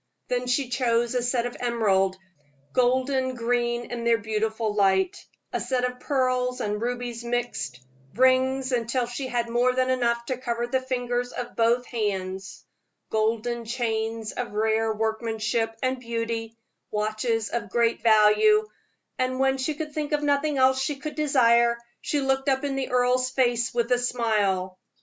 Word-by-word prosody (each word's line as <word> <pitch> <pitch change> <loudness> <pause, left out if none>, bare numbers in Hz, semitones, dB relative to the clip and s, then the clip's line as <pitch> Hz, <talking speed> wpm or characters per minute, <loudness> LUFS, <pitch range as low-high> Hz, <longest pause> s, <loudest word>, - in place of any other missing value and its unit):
Then 250 0 -1
she 250 +1 0
chose 240 -2 +1
a 250 - +1
set 245 0 0
of 245 - -4
emerald, 200 -6 +1 0.6
golden 260 +1 +1
green 240 0 -1
in 240 -1 -4
their 235 0 +4
beautiful 220 +1 -1
light; 190 -2 +2 0.3
a - - 0
set 255 -2 -1
of 250 0 -2
pearls 255 -2 0
and 210 -2 -2
rubies 240 -1 -3
mixed; 240 - -3 0.4
rings 260 +1 +3
until 240 +1 0
she 245 +3 -5
had 240 -2 -1
more 240 +2 +2
than 255 0 +1
enough 235 -2 0
to 255 0 -3
cover 240 -2 -2
the 260 +2 0
fingers 245 -1 -2
of 245 - -6
both 235 +2 +2
hands; 190 -5 -4 0.5
golden 230 +2 0
chains 225 -2 -2
of 245 -3 -5
rare 220 +1 +1
workmanship 225 +1 -1
and 255 0 0
beauty; 230 -1 -4 0.3
watches 215 +1 -1
of 230 -4 -3
great 235 +2 +1
value; 225 - +5 0.5
and 255 0 0
when 265 0 +2
she 295 +3 -1
could 300 0 -5
think 300 0 -3
of 295 0 +1
nothing 285 0 +1
else 260 0 +4
she 285 +2 -1
could 300 +2 -6
desire, 235 -5 +3 0.2
she 290 - -1
looked 270 +1 +1
up 265 0 +1
in 280 -1 -1
the 270 -1 -2
earl's 250 0 +2
face 245 -2 +1
with 235 0 -1
a 245 - +4
smile. 205 -7 0
240 Hz, 160 wpm, -25 LUFS, 225-255 Hz, 0.6 s, value